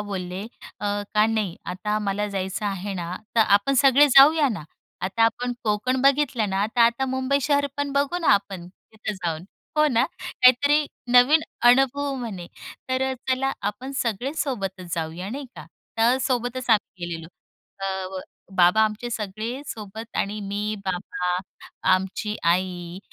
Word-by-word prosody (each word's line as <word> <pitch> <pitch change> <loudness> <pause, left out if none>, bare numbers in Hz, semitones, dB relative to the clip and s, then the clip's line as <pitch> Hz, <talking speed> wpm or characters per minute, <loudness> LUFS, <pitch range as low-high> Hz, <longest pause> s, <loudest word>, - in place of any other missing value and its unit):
बोलले 190 -2 -5 0.4
अ, - - -5 0.3
का 210 +1 +5
नाही 215 -6 -1
आता 210 +4 -2
मला 205 0 -1
जायचं 195 +1 -3
आहे 195 0 -3
ना 175 -1 -4 0.2
तर 225 - +6
आपण 205 +6 +4
सगळे 275 +2 +6
जाऊया 290 +1 +8
ना. 210 -9 -4 0.4
आता 190 +5 0
आपण 245 +2 0
कोकण 215 +5 0
बघितलं 270 -6 +2
ना, 195 +2 +1
तर 230 +2 -2
आता 235 +3 +4
मुंबई 260 +2 0
शहर 285 0 +2
पण 285 -1 -2
बघू 285 +5 +1
ना 325 - 0
आपण 200 -3 -1 0.3
तिथं 215 0 -4
जाऊन, 170 -3 -4 0.3
हो 305 - +5
ना. 240 -1 +3 0.2
काहीतरी 285 +4 +3 0.3
नवीन 260 +6 +6 0.3
अनुभव 270 +2 +3
म्हणे. 215 -9 -6 0.4
तर 260 0 0
अ, - - -2 0.2
चला 270 +1 +1 0.2
आपण 260 +6 -9
सगळे 240 +4 -2
सोबतच 195 - -3
जाऊया, 165 +3 -4
नाही 275 +3 -5
का. - - -9 0.3
तर 240 +3 +4
सोबतच 245 0 -2
आम्ही 195 -4 +1
गेलेलो. 165 -1 -6 0.5
अ, 195 - -3 0.3
व 185 - -3 0.4
बाबा 180 +4 +5
आमचे 215 +3 -3
सगळे 220 +5 -4
सोबत 220 +1 -8
आणि 210 +1 -1
मी, 205 +2 -3
बाबा, 180 -1 -2 0.6
आमची 195 +3 -3
आई 175 0 0
215 Hz, 155 wpm, -24 LUFS, 190-260 Hz, 0.6 s, जाऊया